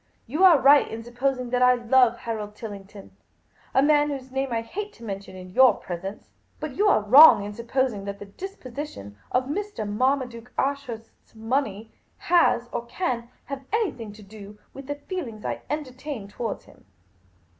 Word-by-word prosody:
You 305 +10 -1
are 355 -5 +8
right 280 +2 +6
in 225 +1 -7
supposing 250 +1 -2
that 250 0 +1
I 250 0 +6
love 245 0 +3
Harold 210 -2 -5
Tillington 200 -2 -10 0.3
— - - -33
a - - +4
man 295 0 +4
whose 265 -2 -6
name 270 0 -2
I 230 -1 -1
hate 415 - -6
to 235 - -16
mention 195 -3 -7
in 185 0 -10
your 260 +5 +6
presence. 190 +3 -7 0.3
But 305 -4 -5
you 415 - +2
are 300 - +4
wrong 255 0 +9
in 205 +1 -6
supposing 235 -2 -1
that 200 0 -5
the 205 - -9
disposition 255 - -8 0.2
of 255 - +2
Mr. 320 - -4
Marmaduke 245 +1 -1
Ashurst's 265 -6 -4
money 225 -2 -2 0.3
has 335 -8 +3
or 235 - -4
can 240 -6 -3 0.2
have 275 -1 -6
anything 375 - -1
to 210 0 -14
do 205 0 -12 0.2
with 275 -1 -10
the 290 - -3
feelings 285 - -6
I - - -3
entertain 275 -5 -5
toward;:' 215 +1 -5
him. - - -20
245 Hz, 170 wpm, -25 LUFS, 215-280 Hz, 0.3 s, wrong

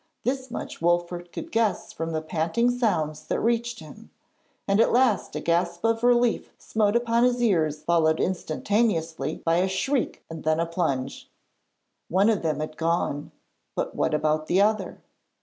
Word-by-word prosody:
This 260 +1 -2
much 235 - -6
Wolfert 175 +1 0
could 330 - -7
guess 225 -5 0
from 165 +1 -4
the 160 -1 -2
panting 170 +9 +1
sounds 160 -11 -1
that - - 0
reached 235 -2 0
him, 185 +9 -13 0.6
and 200 +2 +4
at - - +3
last 245 -4 +2
a - - -1
gasp 170 +3 0
of 225 0 +2
relief 245 -1 +2
smote 215 -1 0
upon 235 0 +2
his 250 0 +3
ears 165 -10 +1
followed 160 -2 +2
instantaneously 165 -4 0
by 165 0 +3
a 185 +2 +2
shriek 245 +8 -1
and 160 -2 -8
then 155 +1 +1
a 165 - +2
plunge. 140 -6 -2 0.8
One 195 +5 +4
of 210 - 0
them 155 -2 -1
had 155 0 -5
gone, 165 -3 -1 0.4
but - - -3
what 155 - +1
about 155 0 0
the 185 - +2
other? 215 +2 +1
175 Hz, 165 wpm, -25 LUFS, 160-230 Hz, 0.8 s, and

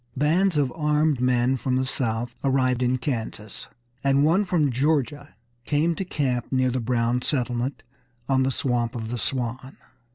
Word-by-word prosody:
Bands 165 +5 +2
of 140 -3 +1
armed 150 -3 +1
men 125 +1 +2
from 130 +1 -1
the 130 0 +1
South 120 -3 -2
arrived 130 -2 +2
in 125 +1 +2
Kansas, 115 -5 -5 0.4
and 140 0 +3
one 175 +6 +3
from 165 -7 +1
Georgia 145 +1 -1 0.3
came 150 +5 +1
to 195 - -3
camp 135 -8 -2
near 130 -1 +2
the 130 - -1
Brown 120 +1 0
settlement 125 -1 -2 0.4
on 135 -1 +2
the 130 - +2
Swamp 120 -3 -1
of 110 -2 -4
the 120 0 -3
Swan. 130 +2 -3
130 Hz, 160 wpm, -24 LUFS, 120-145 Hz, 0.4 s, and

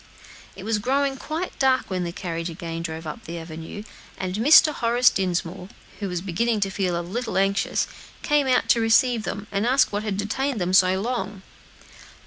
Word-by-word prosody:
It 190 - -9
was 215 0 0
growing 270 +4 0
quite 320 +6 -5
dark 260 -5 +2
when 180 -1 -1
the 170 - -3
carriage 170 -1 -4
again 165 0 -6
drove 160 -1 -6
up 155 - -7
the 170 +1 -6
avenue; 165 +4 -8 0.3
and 185 -1 -3
Mr. 295 +8 +6
Horace 240 0 +3
Dinsmore, 180 0 -2 0.3
who 200 - -3
was 180 -1 -3
beginning 210 +5 0
to 195 -1 0
feel 180 -3 -1
a - - -4
little 225 +3 -3
anxious, 195 +1 +1 0.4
came 295 -2 +2
out 255 -1 +2
to 235 - +4
receive 225 0 +3
them, 200 +1 -4
and 200 0 0
ask 255 -1 +3
what 205 - 0
had 210 -3 -3
detained 240 +5 -2
them 180 0 -1
so 185 0 +5
long. 210 -3 -3
200 Hz, 185 wpm, -24 LUFS, 180-240 Hz, 0.4 s, Mr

